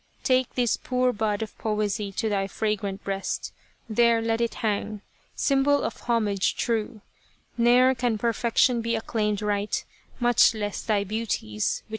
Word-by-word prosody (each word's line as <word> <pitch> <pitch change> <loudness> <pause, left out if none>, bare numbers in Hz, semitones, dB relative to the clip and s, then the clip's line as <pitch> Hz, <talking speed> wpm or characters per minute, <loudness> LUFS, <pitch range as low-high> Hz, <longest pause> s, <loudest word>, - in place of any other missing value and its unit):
Take 255 -1 +1
this 245 -3 +1
poor 250 0 0
bud 215 0 -1
of 220 - -9
poesy 210 -2 -1
to 220 - -1
thy 195 -2 0
fragrant 205 -1 -2
breast, 195 -1 -3 0.3
There 230 +1 +3
let 225 0 0
it 235 - -1
hang, 210 -1 -2 0.3
symbol 280 +1 +2
of - - -4
homage 215 -5 0
true: 225 -1 -2 0.5
Ne'er 245 +2 +5
can 245 -3 -1
perfection 235 +1 +2
be 230 0 -1
acclaimed 215 -2 -1
right, 205 0 -1 0.3
Much 240 -1 +4
less 205 -2 -3
thy 210 -2 +1
beauties, 220 +3 -2
which 110 - -13
are 105 0 -1
infinite - - -36
220 Hz, 155 wpm, -25 LUFS, 205-235 Hz, 0.5 s, Ne'er